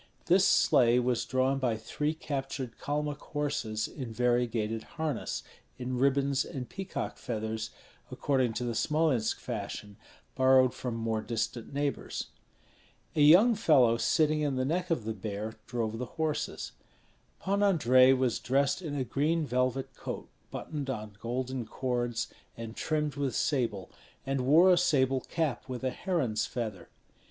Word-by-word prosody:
This 185 Hz, +2 st, +5 dB
sleigh 120 Hz, 0 st, +5 dB
was 125 Hz, -1 st, 0 dB
drawn 130 Hz, +1 st, +1 dB
by 120 Hz, -4 st, 0 dB
three 150 Hz, +7 st, -2 dB
captured 135 Hz, -5 st, -4 dB
Kalmuk 150 Hz, 0 st, -2 dB
horses 125 Hz, -7 st, -2 dB
in 130 Hz, -6 st, -7 dB
variegated 120 Hz, -2 st, 0 dB, 0.2 s
harness, 155 Hz, -5 st, -2 dB, 0.3 s
in 125 Hz, 0 st, -3 dB
ribbons 140 Hz, 0 st, +2 dB
and 130 Hz, -3 st, -6 dB
peacock 195 Hz, -1 st, -5 dB
feathers, 110 Hz, -1 st, -3 dB, 0.4 s
according 130 Hz, -5 st, 0 dB
to 120 Hz, -, -3 dB
the 120 Hz, -1 st, -2 dB
Smolensk 135 Hz, -2 st, +1 dB
fashion, 105 Hz, -3 st, -6 dB, 0.4 s
borrowed 130 Hz, -1 st, +5 dB
from 125 Hz, -3 st, -4 dB
more 115 Hz, -1 st, -1 dB
distant 115 Hz, 0 st, -3 dB
neighbors. 140 Hz, 0 st, -3 dB, 0.9 s
A 150 Hz, -, +2 dB
young 180 Hz, +11 st, +7 dB
fellow 140 Hz, -, +4 dB
sitting 155 Hz, +4 st, +2 dB
in 145 Hz, -3 st, 0 dB
the 130 Hz, 0 st, 0 dB
neck 180 Hz, +6 st, -1 dB
of 165 Hz, -9 st, 0 dB
the 110 Hz, -, -2 dB
bear 105 Hz, +1 st, -5 dB
drove 115 Hz, -2 st, -2 dB
the 125 Hz, -, -2 dB
horses. 160 Hz, -1 st, -2 dB, 0.7 s
Pan 200 Hz, +1 st, 0 dB
Andrei 130 Hz, -10 st, +5 dB
was 130 Hz, -3 st, +1 dB
dressed 140 Hz, +7 st, +1 dB
in 155 Hz, -5 st, -4 dB
a 135 Hz, -, 0 dB
green 150 Hz, +6 st, 0 dB
velvet 130 Hz, 0 st, -1 dB
coat -, -, -6 dB, 0.2 s
buttoned 145 Hz, -3 st, -5 dB
on 110 Hz, -5 st, -5 dB
golden 125 Hz, +2 st, -3 dB
cords 120 Hz, -2 st, -2 dB, 0.3 s
and 115 Hz, 0 st, -7 dB
trimmed 150 Hz, -3 st, -1 dB
with 140 Hz, -3 st, -1 dB
sable, 115 Hz, -9 st, -1 dB, 0.3 s
and 135 Hz, -1 st, -1 dB
wore 170 Hz, +6 st, +7 dB
a -, -, +3 dB
sable 135 Hz, -6 st, +2 dB
cap 155 Hz, -6 st, -2 dB
with 125 Hz, 0 st, -5 dB
a 130 Hz, -, 0 dB
heron's 135 Hz, -, -1 dB
feather. 110 Hz, -8 st, -5 dB
130 Hz, 145 wpm, -30 LUFS, 115-150 Hz, 0.9 s, young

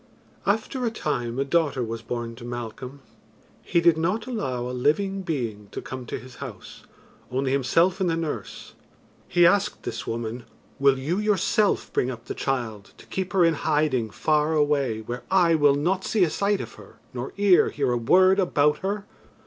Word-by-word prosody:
After 220 Hz, +5 st, 0 dB
a 235 Hz, -, +2 dB
time 125 Hz, -, -3 dB
a 135 Hz, -, 0 dB
daughter 145 Hz, -4 st, +1 dB
was 115 Hz, 0 st, -4 dB
born 115 Hz, 0 st, -5 dB
to 120 Hz, -, -11 dB
Malcolm, 120 Hz, +3 st, -7 dB, 0.6 s
he 170 Hz, -, +1 dB
did 170 Hz, -1 st, +4 dB
not 185 Hz, +7 st, 0 dB
allow 205 Hz, -, -3 dB
a -, -, -4 dB
living 195 Hz, +10 st, +1 dB
being 120 Hz, -, -3 dB
to -, -, -4 dB
come 130 Hz, -2 st, -7 dB
to -, -, -4 dB
his 125 Hz, -1 st, -12 dB
house, -, -, -9 dB, 0.5 s
only 130 Hz, +1 st, -1 dB
himself 165 Hz, +8 st, +2 dB
and 185 Hz, -, +2 dB
the 165 Hz, -, +1 dB
nurse. 160 Hz, -2 st, -5 dB, 0.5 s
He 175 Hz, -1 st, +4 dB
asked 205 Hz, +3 st, +2 dB
this 115 Hz, -, -5 dB
woman, 115 Hz, +1 st, -4 dB, 0.3 s
"Will 140 Hz, -1 st, +4 dB
you 155 Hz, +9 st, -1 dB
yourself 210 Hz, 0 st, +1 dB
bring 125 Hz, -, +1 dB
up 120 Hz, -2 st, -7 dB
the -, -, -4 dB
child 115 Hz, -7 st, -3 dB
to -, -, -15 dB
keep 190 Hz, -1 st, -4 dB
her 185 Hz, -3 st, +5 dB
in 165 Hz, -, +4 dB
hiding 145 Hz, -6 st, 0 dB
far 150 Hz, +7 st, +1 dB
away 140 Hz, -7 st, +1 dB
where 120 Hz, +3 st, -5 dB
eye 180 Hz, -3 st, +4 dB
will 145 Hz, -3 st, +4 dB
not 180 Hz, +6 st, 0 dB
see 210 Hz, -4 st, +2 dB
a 165 Hz, -, +2 dB
sight 200 Hz, +2 st, 0 dB
of -, -, -8 dB
her -, -, -16 dB, 0.2 s
nor 125 Hz, +1 st, -5 dB
ear 200 Hz, -3 st, +5 dB
hear 140 Hz, -3 st, -1 dB
a -, -, +1 dB
word 185 Hz, -, +4 dB
about 150 Hz, -5 st, +2 dB
her?" 200 Hz, +1 st, -3 dB
150 Hz, 185 wpm, -25 LUFS, 125-185 Hz, 0.6 s, her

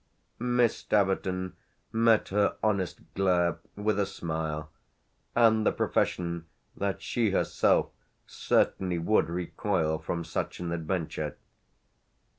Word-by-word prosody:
Miss 120 Hz, -1 st, +2 dB
Staverton 95 Hz, -2 st, 0 dB, 0.4 s
met 115 Hz, -1 st, +3 dB
her 100 Hz, +1 st, +2 dB
honest 100 Hz, -4 st, 0 dB
glare 90 Hz, -3 st, +2 dB, 0.2 s
with 105 Hz, 0 st, 0 dB
a 100 Hz, -, +2 dB
smile 80 Hz, -4 st, -4 dB, 0.6 s
and 110 Hz, -2 st, +5 dB
the -, -, +3 dB
profession 85 Hz, -1 st, -1 dB, 0.3 s
that 100 Hz, -1 st, -2 dB
she 115 Hz, -3 st, +1 dB
herself 95 Hz, -, +2 dB, 0.3 s
certainly 90 Hz, -2 st, +1 dB
would 85 Hz, +2 st, +2 dB
recoil 85 Hz, -2 st, -1 dB
from 85 Hz, -1 st, -3 dB
such -, -, -3 dB
an 85 Hz, -1 st, -3 dB
adventure. 80 Hz, -2 st, -2 dB
95 Hz, 105 wpm, -29 LUFS, 85-105 Hz, 0.6 s, and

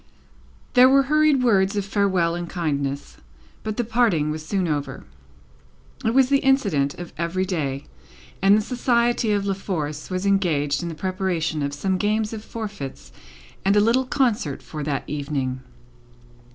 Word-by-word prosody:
There 255 Hz, +1 st, +7 dB
were 275 Hz, +1 st, +5 dB
hurried 300 Hz, -1 st, +3 dB
words 200 Hz, -4 st, +3 dB
of 205 Hz, -1 st, -1 dB
farewell 190 Hz, -4 st, +1 dB
and 175 Hz, 0 st, -4 dB
kindness, 140 Hz, -5 st, -3 dB, 0.4 s
but 215 Hz, -1 st, -4 dB
the 240 Hz, -, +1 dB
parting 220 Hz, -10 st, +1 dB
was 155 Hz, 0 st, -5 dB
soon 185 Hz, +2 st, -1 dB
over. 145 Hz, -3 st, -3 dB, 1.0 s
It 225 Hz, +2 st, 0 dB
was 265 Hz, -1 st, +5 dB
the 280 Hz, -1 st, +4 dB
incident 200 Hz, -, +2 dB
of 175 Hz, -1 st, -9 dB
every 175 Hz, +2 st, -1 dB
day, 145 Hz, -7 st, -3 dB, 0.6 s
and 195 Hz, +2 st, +6 dB
the -, -, +2 dB
society 240 Hz, -2 st, +1 dB
of 200 Hz, -1 st, 0 dB
La 200 Hz, -, +1 dB
Force 155 Hz, -6 st, -4 dB
were 185 Hz, -, -1 dB
engaged 180 Hz, -7 st, +1 dB
in 170 Hz, -, -4 dB
the 165 Hz, -, -6 dB
preparation 180 Hz, -3 st, -2 dB
of 140 Hz, 0 st, -2 dB
some 185 Hz, +5 st, -1 dB
games 215 Hz, +1 st, 0 dB
of 215 Hz, -1 st, -6 dB
forfeits 210 Hz, -, -7 dB, 0.5 s
and 195 Hz, +1 st, +3 dB
a -, -, +6 dB
little 235 Hz, +5 st, +3 dB
concert, 235 Hz, -, 0 dB
for 155 Hz, -, -7 dB
that 145 Hz, -1 st, -2 dB
evening. 140 Hz, -3 st, -3 dB
190 Hz, 160 wpm, -23 LUFS, 155-220 Hz, 1.0 s, There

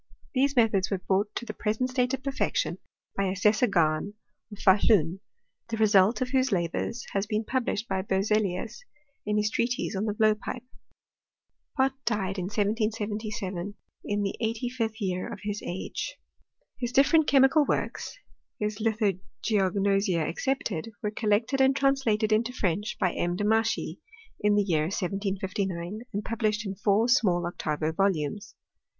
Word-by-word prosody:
These 275 Hz, +1 st, +2 dB
methods 215 Hz, -6 st, +3 dB
were 195 Hz, -, 0 dB
brought 195 Hz, +3 st, -1 dB
to 240 Hz, -, -3 dB
the 215 Hz, -, -5 dB
present 220 Hz, +5 st, -1 dB
state 250 Hz, -1 st, +1 dB
of 265 Hz, -, -13 dB
perfection 275 Hz, -, -1 dB, 0.4 s
by 195 Hz, -, +1 dB
Assessor 210 Hz, +6 st, +3 dB
Gahn, 170 Hz, +1 st, +1 dB, 0.4 s
of 205 Hz, -, -9 dB
Fahluji, 190 Hz, -3 st, +4 dB, 0.5 s
the 225 Hz, -, -2 dB
[result 210 Hz, +1 st, +4 dB
of 255 Hz, -, 0 dB
whose 260 Hz, -1 st, +2 dB
la 175 Hz, -3 st, +2 dB
bours 230 Hz, +7 st, -4 dB
has 195 Hz, +1 st, -1 dB
been 215 Hz, +1 st, 0 dB
published 240 Hz, -3 st, -1 dB
by 190 Hz, -1 st, -1 dB
Berzelius, 200 Hz, +1 st, 0 dB, 0.5 s
in 210 Hz, 0 st, +1 dB
his 210 Hz, 0 st, +1 dB
treatise 245 Hz, -1 st, -1 dB
on 195 Hz, +3 st, -1 dB
the 210 Hz, -2 st, -1 dB
blowpipe. 215 Hz, +3 st, +1 dB, 1.1 s
Pott 265 Hz, 0 st, +3 dB
died 195 Hz, -4 st, -1 dB
in 180 Hz, -, -2 dB
1777, 210 Hz, -2 st, -2 dB, 0.3 s
in 205 Hz, 0 st, -1 dB
the 195 Hz, -, -1 dB
eighty 230 Hz, +2 st, -1 dB
fifth 225 Hz, -3 st, -3 dB
year 185 Hz, -3 st, -2 dB
of -, -, -8 dB
his 205 Hz, 0 st, -3 dB
age. 190 Hz, -, -4 dB, 0.6 s
His 240 Hz, -1 st, -2 dB
different 295 Hz, +4 st, +4 dB
chemical 275 Hz, +2 st, +5 dB
works 395 Hz, -, -2 dB, 0.4 s
(his 210 Hz, 0 st, -2 dB
Lithogeognosia 195 Hz, -4 st, 0 dB
ex -, -, -5 dB
cepted) 230 Hz, -11 st, -1 dB, 0.2 s
were 210 Hz, -, 0 dB
collected 220 Hz, +5 st, +1 dB
and 265 Hz, 0 st, +4 dB
translated 265 Hz, -6 st, +2 dB
into 230 Hz, +3 st, +2 dB
French 205 Hz, -1 st, -1 dB
by 185 Hz, -, +1 dB
M. 175 Hz, 0 st, -1 dB
Demachy, 220 Hz, +2 st, 0 dB, 0.4 s
in 210 Hz, 0 st, +3 dB
the 205 Hz, -, +3 dB
year 160 Hz, -6 st, +1 dB
1759, 190 Hz, 0 st, -2 dB
and 205 Hz, -1 st, -3 dB
published 215 Hz, -1 st, -1 dB
in 195 Hz, -, -3 dB
four 205 Hz, +3 st, +2 dB
small 195 Hz, -9 st, +3 dB
octavo 155 Hz, -2 st, -2 dB
volumes. 190 Hz, 0 st, -1 dB
210 Hz, 150 wpm, -27 LUFS, 195-230 Hz, 1.1 s, chemical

